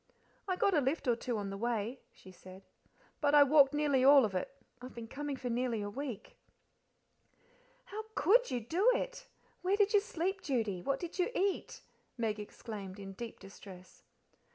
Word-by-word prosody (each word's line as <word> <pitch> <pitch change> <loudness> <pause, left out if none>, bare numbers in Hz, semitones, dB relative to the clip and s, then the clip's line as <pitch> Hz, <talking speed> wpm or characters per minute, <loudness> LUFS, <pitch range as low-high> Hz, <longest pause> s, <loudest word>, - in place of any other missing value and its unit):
"I 370 - 0
got 390 +2 +2
a 305 - +4
lift 275 +2 -1
or 240 - +4
two 240 0 -3
on 200 -1 -4
the 195 - -5
way," 235 +2 -2
she 185 - -15
said, 185 +1 -13 0.6
"but 290 -1 +3
I 290 - +9
walked 280 -1 +6
nearly 290 -3 +2
all 275 -2 +8
of 205 - -4
it, 185 +8 -2 0.3
I've 255 +1 -10
been 230 -1 -7
coming 285 +3 -4
for 255 - -5
nearly 235 -2 -1
a 205 - -5
week:" 260 -2 -6 1.5
"How 435 +2 -7
COULD 470 +11 +4
you 245 - -2
do 360 - +3
it? - - -4 0.3
Where 380 +3 +1
did 415 0 +3
you 410 - +7
sleep, 380 -1 -3
Judy? 220 -10 -1
What 275 +7 -1
did 345 +2 -7
you 360 - +2
eat?" 390 0 -1 0.3
Meg 220 -3 -1
exclaimed, 205 -2 -8
in 195 -1 -8
deep 230 +3 -8
distress. 190 -2 -13
255 Hz, 180 wpm, -33 LUFS, 215-330 Hz, 1.5 s, I